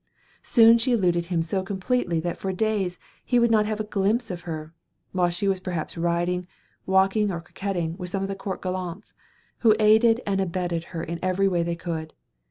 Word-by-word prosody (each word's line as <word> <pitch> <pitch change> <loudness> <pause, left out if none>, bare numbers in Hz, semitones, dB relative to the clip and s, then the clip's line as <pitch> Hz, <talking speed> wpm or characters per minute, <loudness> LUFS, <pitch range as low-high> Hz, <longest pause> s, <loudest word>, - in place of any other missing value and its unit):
Soon 230 -1 +6
she 250 +2 +2
eluded 175 -6 +2
him 170 -2 0
so 190 +4 -1
completely 190 -1 -1
that 175 +1 -3
for 190 - -2
days 190 -2 -1 0.3
he 245 - +1
would 235 -1 +4
not 215 -1 +3
have 215 0 -2
a - - 0
glimpse 210 +2 0
of 175 -1 -6
her, 155 0 -6 0.4
while 180 -1 +2
she 175 +3 -1
was 190 -1 +1
perhaps 180 -4 -4
riding, 175 +1 -1 0.4
walking 195 +2 +3
or 170 - -3
coquetting 175 -1 -3
with 180 -1 -5
some 195 +1 -2
of - - -1
the 195 - -3
court 195 -1 -5
gallants, 185 +1 -5 0.5
who 220 -3 +5
aided 220 +2 +5
and 195 -1 0
abetted 175 -2 -2
her 165 -2 -6
in 170 +1 -5
every 185 +1 +1
way 175 -3 +1
they 170 0 -1
could. 165 -2 -5
185 Hz, 195 wpm, -25 LUFS, 175-210 Hz, 0.5 s, Soon